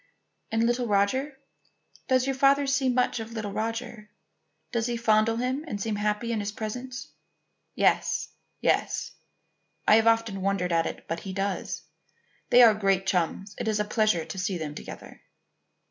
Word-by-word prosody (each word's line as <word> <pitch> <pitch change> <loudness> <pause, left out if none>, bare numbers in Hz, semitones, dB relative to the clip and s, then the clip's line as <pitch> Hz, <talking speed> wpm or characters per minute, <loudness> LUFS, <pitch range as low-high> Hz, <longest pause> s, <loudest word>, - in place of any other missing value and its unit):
"And 225 0 +2
little 240 +1 +1
Roger? 260 +8 +1 0.7
Does 255 -1 +3
your 270 - 0
father 275 +1 +4
see 275 -1 +1
much 250 -1 +1
of 225 +1 -7
little 215 -3 -4
Roger? 225 0 -4 0.6
Does 235 -1 0
he 240 -1 -1
fondle 225 0 +3
him 255 +4 -1
and 205 -8 -4
seem 210 +1 -2
happy 210 +3 -1
in 225 - 0
his 205 0 -3
presence?" 250 +5 -6 0.7
"Yes; - - +2 0.3
yes. - - 0 0.8
I 215 - +7
have 225 0 +3
often 225 -4 +2
wondered 190 -2 0
at 165 -1 +2
it, - - -7
but 165 +1 -3
he 190 +1 -7
does. 195 0 -3 0.7
They 245 0 +8
are 225 -2 +8
great 195 -2 +1
chums. 190 +2 -1
It - - -3
is 215 -1 +1
a 210 - +1
pleasure 215 -6 +1
to 165 +4 -6
see 190 0 -1
them 155 -3 -5
together." - - -10
220 Hz, 165 wpm, -27 LUFS, 200-245 Hz, 0.8 s, They